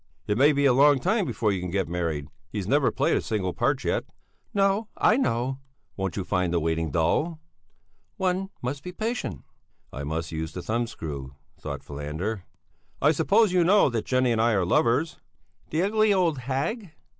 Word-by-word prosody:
"It 105 - 0
may 140 +6 +5
be 140 -1 +1
a 135 - +5
long 140 +2 +6
time 195 - +1
before 110 -9 0
you 95 -2 -2
can 90 - -4
get 95 +1 -1
married. 80 -4 -2 0.2
He's 100 -1 -4
never 140 +3 +3
played - - +1
a - - +1
single 95 -5 -2
part - - 0
yet." - - 0 0.5
"No, 200 +2 +1
I 215 - +4
know." 130 - 0 0.4
"Won't 95 -1 -3
you 95 - -1
find 90 -1 0
the 85 - +2
waiting 80 0 -1
dull?" 120 - 0 0.8
"One 190 +1 0
must 135 +3 -3
be 180 - -7
patient." 225 +5 -3 0.5
I 70 - -5
must 80 +2 -3
use 80 0 -4
the 90 - -6
thumbscrew, 80 - -4 0.3
thought - - -6
Falander. 80 +8 -4 0.5
"I 145 - +4
suppose 195 +6 +3
you 180 -1 +4
know 185 -5 +5
that 115 -2 -2
Jenny 130 -1 +2
and 115 -1 +2
I 115 0 +3
are 95 -3 +2
lovers?" 120 - +1 0.5
"The 160 +3 0
ugly, 215 +1 +3
old 175 -7 +2
hag!" 145 - -3
120 Hz, 180 wpm, -26 LUFS, -, 0.8 s, long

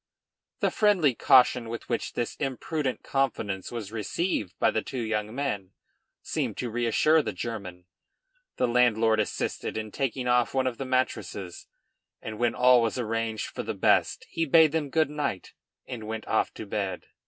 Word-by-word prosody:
The - - +2
friendly 190 - +3
caution 125 -2 +4
with 115 0 -6
which 120 - -2
this 120 - -2
imprudent 135 0 -2
confidence 110 -8 -1
was 110 -4 -5
received 110 - -2
by - - +3
the 110 - 0
two 130 +1 -5
young 110 0 -2
men, 105 -9 -3 0.5
seemed - - -2
to 120 -2 -3
reassure 120 +7 +3
the - - -3
German. 95 -6 -6 0.7
The - - +2
landlord 115 -2 +3
assisted 110 - -2
in 110 -1 -4
taking 130 -1 -2
off 125 +1 +2
one 130 -1 +2
of 125 -2 -2
the 135 - -3
mattresses, 130 -8 -2 0.5
and 110 -1 -7
when 120 -1 +1
all 125 -1 +6
was 115 +2 0
arranged 115 -2 -2
for - - -6
the - - -4
best - - +2
he 165 - -2
bade 160 0 +6
them 155 -2 -1
good 155 0 +1
night 145 -10 -3 0.3
and 115 -4 -7
went 110 0 -5
off 110 - +1
to - - -7
bed. 100 -3 -3
120 Hz, 165 wpm, -27 LUFS, 110-135 Hz, 0.7 s, all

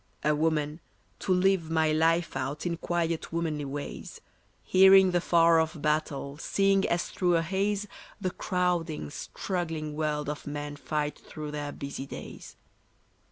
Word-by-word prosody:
A 150 - +3
woman, 155 0 0 0.4
to - - -2
live 185 -2 +3
my 160 -1 +2
life 165 +2 +2
out 140 +5 -3
In 170 -1 0
quiet 170 -1 -2
womanly 160 -3 -2
ways, 140 +1 -6 0.4
Hearing 190 0 +7
the 175 -1 +2
far 170 -1 +5
off 160 0 -1
battle, 145 -1 -1
Seeing 195 +2 +2
as 170 0 -1
through 180 -2 +2
a 165 - +2
haze 200 +4 -1 0.3
The 185 -3 -1
crowding, 175 - -1
struggling 160 -5 -4
world 150 -1 -1
of 150 0 -5
men 145 0 -4
fight 150 +1 -3
through 150 -1 -7
their 145 -1 -4
busy 140 -1 -6
days. - - -9
160 Hz, 145 wpm, -28 LUFS, 150-175 Hz, 0.4 s, Hearing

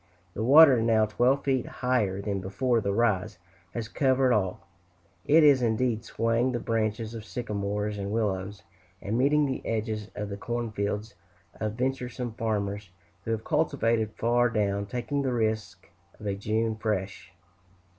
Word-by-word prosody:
The 110 - -3
water, 135 -1 +7
now 110 -1 +3
twelve 125 +6 +1
feet 130 -3 0
higher 105 -6 -1
than 100 -2 -2
before 115 +5 0
the 100 - -1
rise, 100 -4 0 0.4
has 115 -2 -3
covered 130 +1 +2
all; 95 -5 -1 0.6
it 160 +2 +5
is, 140 -3 +6
indeed, 115 0 0
swaying 115 +3 0
the 120 - -1
branches 110 -1 -2
of 115 -2 -7
sycamores 105 -2 -3
and 100 0 -3
willows, 100 -3 -2 0.4
and 105 - -3
meeting 145 +4 +3
the 130 -2 -3
edges 110 -1 -3
of 105 0 -4
the 100 - -5
corn 120 +1 -3
fields 105 +1 -3 0.5
of 110 -1 -2
venturesome 125 -1 -3
farmers 105 -3 -2 0.4
who - - -5
have 110 -1 -1
cultivated 115 -8 0
far 120 +1 +2
down, 100 -2 -1
taking 125 +6 -2
the 130 -2 -1
risk 110 -6 -2 0.3
of 105 - -10
a 100 - 0
"June 110 +3 -1
fresh." 95 -4 -3
110 Hz, 155 wpm, -27 LUFS, 105-125 Hz, 0.6 s, water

